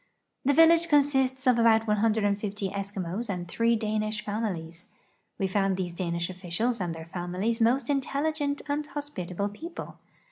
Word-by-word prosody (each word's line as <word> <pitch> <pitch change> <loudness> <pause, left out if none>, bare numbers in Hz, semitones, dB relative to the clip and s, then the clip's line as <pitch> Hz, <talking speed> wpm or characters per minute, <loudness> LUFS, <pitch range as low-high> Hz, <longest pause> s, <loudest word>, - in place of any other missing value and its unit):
The 285 - +3
village 330 +1 +6
consists 270 -3 +2
of 250 -2 +4
about 225 -1 +5
150 210 -2 +1
Eskimos 200 +2 -4
and 180 -3 -3
three 230 +6 +2
Danish 215 -1 -2
families. 180 -6 -4 0.5
We 195 - 0
found 195 0 +1
these 180 -2 -3
Danish 170 -1 -2
oHicials 185 +6 -2
and 170 -2 -2
their 160 0 -8
families 180 +7 -2
most 245 +4 +3
intelligent 285 +1 -1
and 290 +1 0
hospitable 200 -11 -4
people. 330 - -8
215 Hz, 140 wpm, -28 LUFS, 185-260 Hz, 0.5 s, village